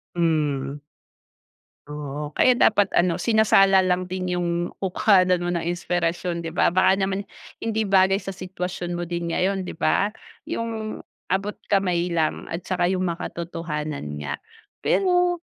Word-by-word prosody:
Hmm. 150 -5 0 1.1
Oo 150 0 -6
kaya 250 -1 +4
dapat 205 -2 +4
ano 175 -1 +2
sinasala 195 -4 +5
lang 180 0 0
din 185 -1 -2
yung 175 -1 -1 0.3
kukuhanan 185 -1 +3
mo 175 0 -2
ng 170 0 -1
inspirasyon 175 0 -1
di 165 - -4
ba? 170 - +2
Baka 190 +1 +4
naman 195 0 -1 0.4
hindi 220 -1 -1
bagay 195 0 +4
sa 195 -1 -6
sitwasyon 180 -1 -5
mo 175 - -3
din 170 0 -3
ngayon 190 +3 0
di 180 - -7
ba? 200 - +2 0.4
Yung 225 -1 -3 0.3
abot 195 +3 0 0.2
kamay 180 -3 +1
lang 165 -2 -1
at 165 +2 -5
tsaka 180 -1 +1
yung 185 0 0
makatotohanan 160 - -4
nga. 70 -1 -4 0.5
Pero 355 -2 +2
180 Hz, 140 wpm, -24 LUFS, 170-195 Hz, 1.1 s, sinasala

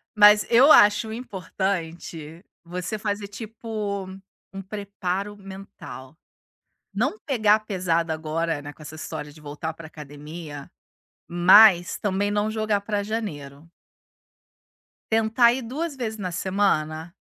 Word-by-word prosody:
Mas 210 0 +7
eu 260 +6 +7
acho 210 +2 +6
importante 175 -6 -5 0.2
você 180 +5 -5
fazer, 205 -1 -3
tipo, 210 -2 -5 0.5
um 195 - -6
preparo 200 0 -4
mental. 190 -7 -11 0.8
Não 430 - -1
pegar 220 -6 +2
pesado 175 -5 -1
agora, 160 0 -2
né, 145 0 -9
com - - -18
essa 155 +1 -9
história 150 -1 -7
de 155 +1 -16
voltar 150 +2 -5
para 160 0 -11
academia, 150 0 -10 0.6
mas 175 +1 +6
também 205 0 0
não 210 +1 0
jogar 215 -2 0
para 205 0 -2
janeiro. 165 -9 -6 1.4
Tentar 225 +2 +4
ir 260 - -4
2 285 +5 -4
vezes 220 -3 -4
na 185 -3 -3
semana 170 -3 -1
195 Hz, 120 wpm, -24 LUFS, 165-215 Hz, 1.4 s, Mas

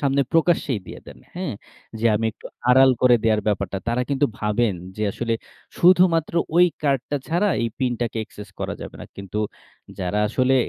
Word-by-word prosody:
সামনে 140 -1 +2
প্রকাশ্যেই 160 - +2
দিয়ে - - -9
দেন। - - -12 0.2
হ্যাঁ, 180 - -3 0.4
যে, 115 - -4
আমি 115 +2 0
একটু - - -12 0.2
আড়াল 130 +1 +7
করে 125 -1 +6
দেয়ার 110 -1 +3
ব্যাপারটা। 100 -1 -1
তারা 120 +2 +1
কিন্তু 140 +1 +2
ভাবেন 105 -1 +1 0.2
যে, 110 - -3
আসলে 115 -1 -1 0.4
শুধুমাত্র 175 -3 +4 0.2
ওই 180 0 +7 0.2
কার্ডটা 140 0 0
ছাড়া 175 +6 +2
এই 115 - +1
পিনটাকে 120 -3 -1
access 105 -1 -11
করা - - -2
যাবে - - -8
না। - - -7
কিন্তু 100 +1 -5 0.6
যারা 95 +3 -1
আসলে 130 +3 +2
125 Hz, 170 wpm, -23 LUFS, 110-145 Hz, 0.6 s, আড়াল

